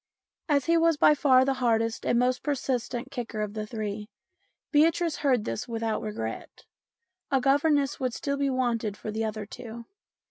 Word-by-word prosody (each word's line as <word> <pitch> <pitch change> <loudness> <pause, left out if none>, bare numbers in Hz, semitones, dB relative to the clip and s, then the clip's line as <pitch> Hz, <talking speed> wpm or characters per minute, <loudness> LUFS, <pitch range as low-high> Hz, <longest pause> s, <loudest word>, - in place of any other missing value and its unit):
As 280 -3 +2
he 335 0 +3
was 330 -1 +3
by 300 - +6
far 260 -3 +4
the 270 - +2
hardest 225 -1 +1
and 240 - +3
most 250 +1 +2
persistent 260 -2 -2
kicker 240 -5 -5
of 210 -1 -3
the 215 -1 -4
three, 210 -1 -5 0.6
Beatrice 325 +2 +3
heard 255 -7 +1
this 115 - -4
without 225 -2 -2
regret; 115 - -6 0.6
a 270 - +3
governess 280 +1 +2
would 255 -2 -2
still 280 -1 -2
be 280 0 +1
wanted 235 -5 -1
for 215 - -5
the 220 +1 -2
other 215 -1 -3
two. 235 +1 -9
245 Hz, 170 wpm, -27 LUFS, 220-280 Hz, 0.6 s, by